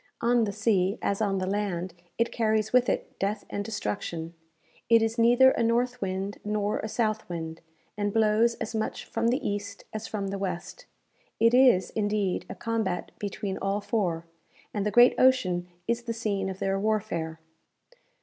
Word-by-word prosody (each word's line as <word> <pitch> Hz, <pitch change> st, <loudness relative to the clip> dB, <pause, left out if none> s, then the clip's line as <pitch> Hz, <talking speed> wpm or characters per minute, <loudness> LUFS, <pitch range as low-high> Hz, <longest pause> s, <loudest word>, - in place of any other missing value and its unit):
On 235 Hz, -1 st, +3 dB
the 205 Hz, -, -2 dB
sea, 200 Hz, -2 st, +1 dB
as 200 Hz, +1 st, 0 dB
on 200 Hz, -2 st, +1 dB
the 185 Hz, -, -1 dB
land, 190 Hz, -3 st, -2 dB, 0.2 s
it 230 Hz, 0 st, +1 dB
carries 220 Hz, -1 st, 0 dB
with 250 Hz, 0 st, +4 dB
it -, -, -3 dB
death 205 Hz, +2 st, -1 dB
and 205 Hz, -, -2 dB
destruction. 170 Hz, -6 st, -4 dB, 0.6 s
It 230 Hz, -1 st, +6 dB
is 225 Hz, +1 st, -1 dB
neither 245 Hz, +3 st, +6 dB
a -, -, -1 dB
north 245 Hz, +2 st, +1 dB
wind 195 Hz, +1 st, -3 dB
nor 210 Hz, 0 st, -1 dB
a -, -, -3 dB
south 220 Hz, -2 st, -1 dB
wind, 165 Hz, -1 st, -5 dB, 0.3 s
and 205 Hz, 0 st, -1 dB
blows 225 Hz, +2 st, +3 dB
as -, -, -5 dB
much 220 Hz, -1 st, -3 dB
from 230 Hz, 0 st, -1 dB
the 250 Hz, +5 st, +1 dB
east 205 Hz, 0 st, -4 dB
as 215 Hz, 0 st, -4 dB
from 200 Hz, -2 st, -3 dB
the 195 Hz, 0 st, -4 dB
west. 190 Hz, -, -5 dB, 0.5 s
It 230 Hz, +1 st, +5 dB
is, 250 Hz, -8 st, +5 dB
indeed, 205 Hz, -3 st, -1 dB
a -, -, -6 dB
combat 220 Hz, -6 st, -2 dB
between 200 Hz, -1 st, -4 dB
all 195 Hz, +1 st, 0 dB
four, 185 Hz, -6 st, -1 dB, 0.5 s
and 210 Hz, -1 st, -1 dB
the -, -, +2 dB
great 240 Hz, +3 st, +7 dB
ocean 185 Hz, -9 st, +3 dB, 0.2 s
is 235 Hz, +1 st, 0 dB
the 235 Hz, -1 st, -4 dB
scene 205 Hz, -4 st, -2 dB
of 190 Hz, -, -5 dB
their 195 Hz, 0 st, 0 dB
warfare. 195 Hz, -7 st, -1 dB
210 Hz, 175 wpm, -27 LUFS, 195-230 Hz, 0.6 s, great